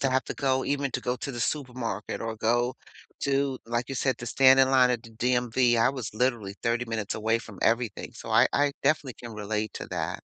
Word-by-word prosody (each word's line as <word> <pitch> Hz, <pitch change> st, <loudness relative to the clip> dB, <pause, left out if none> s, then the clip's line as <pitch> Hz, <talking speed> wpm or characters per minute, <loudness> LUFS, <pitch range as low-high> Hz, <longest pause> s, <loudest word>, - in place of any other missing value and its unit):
to 135 Hz, -, +1 dB
have 130 Hz, 0 st, +1 dB
to -, -, -5 dB
go 130 Hz, -2 st, +1 dB
even 140 Hz, -1 st, -1 dB
to 125 Hz, -, -2 dB
go 125 Hz, 0 st, -1 dB
to 140 Hz, -, -5 dB
the 120 Hz, -, -5 dB
supermarket 125 Hz, -7 st, -3 dB
or 115 Hz, -1 st, -3 dB
go 120 Hz, +3 st, +1 dB, 0.5 s
to, 140 Hz, -1 st, 0 dB
like 120 Hz, +2 st, -2 dB
you 135 Hz, -, -4 dB
said, 130 Hz, +1 st, 0 dB
to 120 Hz, -, -7 dB
stand 135 Hz, +2 st, +6 dB
in 130 Hz, 0 st, +4 dB
line 130 Hz, -2 st, +5 dB
at 120 Hz, -2 st, -1 dB
the 115 Hz, -, -12 dB
DMV. 120 Hz, +1 st, +2 dB
I 115 Hz, -, +4 dB
was 130 Hz, -6 st, -4 dB
literally 115 Hz, -5 st, 0 dB
30 120 Hz, +1 st, +1 dB
minutes 110 Hz, -3 st, -3 dB
away 110 Hz, +1 st, +1 dB
from 105 Hz, -5 st, -11 dB
everything. 115 Hz, -2 st, 0 dB
So 115 Hz, -, -10 dB
I 115 Hz, +3 st, +6 dB
I 145 Hz, 0 st, +2 dB
definitely 140 Hz, -3 st, +1 dB
can 120 Hz, -1 st, -7 dB
relate 105 Hz, +1 st, -3 dB
to -, -, -6 dB
that. -, -, -3 dB
120 Hz, 225 wpm, -27 LUFS, 115-130 Hz, 0.5 s, stand